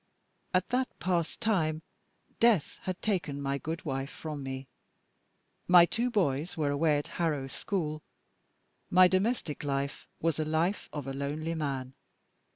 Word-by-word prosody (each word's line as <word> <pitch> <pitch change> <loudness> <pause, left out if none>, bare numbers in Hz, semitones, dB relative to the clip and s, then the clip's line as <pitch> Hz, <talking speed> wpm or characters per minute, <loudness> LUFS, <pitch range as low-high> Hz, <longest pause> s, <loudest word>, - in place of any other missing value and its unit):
At 185 0 +1
that 255 +1 +1
past 175 0 -1
time, 160 -8 +1 0.6
death 225 -9 +3
had 185 -1 -2
taken 170 -9 0
my 140 0 -1
good 165 +5 -4
wife 135 -1 -2
from 150 -2 -6
me; 135 0 -5 1.0
my 175 -1 +9
two 235 +7 0
boys 170 - 0
were 145 -2 +1
away 150 +1 +3
at 145 - -3
Harrow 155 -5 +1
School; 155 +1 -3 0.9
my 185 0 +7
domestic 185 - 0
life 140 0 -2
was 165 -2 +1
the 155 - 0
life 160 +6 0
of 145 -3 -5
a 135 - -4
lonely 150 +4 -2
man. 135 -5 -3
155 Hz, 145 wpm, -30 LUFS, 140-180 Hz, 1.0 s, my